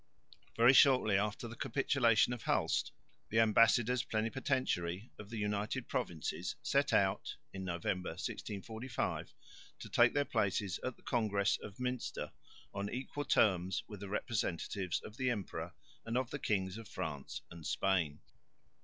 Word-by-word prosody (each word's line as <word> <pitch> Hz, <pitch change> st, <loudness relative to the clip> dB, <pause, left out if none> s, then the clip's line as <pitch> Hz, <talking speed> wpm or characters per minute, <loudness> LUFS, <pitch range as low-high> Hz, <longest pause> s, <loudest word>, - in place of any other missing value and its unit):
Very 120 Hz, +3 st, +7 dB
shortly 130 Hz, -7 st, +6 dB
after 105 Hz, +3 st, 0 dB
the 115 Hz, -, -8 dB
capitulation 120 Hz, -1 st, +3 dB
of 120 Hz, -, -6 dB
Hulst, -, -, +1 dB, 0.4 s
the 110 Hz, -, +2 dB
ambassadors 115 Hz, +2 st, +4 dB
plenipotentiary 110 Hz, -, -1 dB
of 105 Hz, -, -9 dB
the 115 Hz, -, -5 dB
United 105 Hz, +4 st, -1 dB
Provinces 85 Hz, -6 st, -2 dB
set -, -, +2 dB
out -, -, +2 dB, 0.2 s
(November, 90 Hz, -1 st, -2 dB
1645) 110 Hz, +6 st, -4 dB, 0.4 s
to -, -, -9 dB
take 120 Hz, +3 st, +5 dB
their 145 Hz, -1 st, +3 dB
places 100 Hz, -6 st, 0 dB
at 130 Hz, -2 st, -2 dB
the -, -, -24 dB
Congress 105 Hz, -4 st, +1 dB
of 100 Hz, -, -8 dB
Münster 125 Hz, 0 st, -3 dB, 0.4 s
on 100 Hz, 0 st, -3 dB
equal 135 Hz, +3 st, -4 dB
terms 95 Hz, -6 st, +3 dB
with 105 Hz, -2 st, -8 dB
the 100 Hz, -1 st, -7 dB
representatives 95 Hz, -4 st, -1 dB
of 110 Hz, -, -10 dB
the 130 Hz, -1 st, +1 dB
Emperor 105 Hz, -6 st, -4 dB, 0.3 s
and 115 Hz, +2 st, -1 dB
of 130 Hz, -2 st, -1 dB
the -, -, -3 dB
Kings 95 Hz, 0 st, -1 dB
of 115 Hz, -, -10 dB
France 75 Hz, -6 st, -5 dB
and 85 Hz, -1 st, -10 dB
Spain. 85 Hz, -7 st, +1 dB
105 Hz, 140 wpm, -35 LUFS, 95-120 Hz, 0.4 s, Very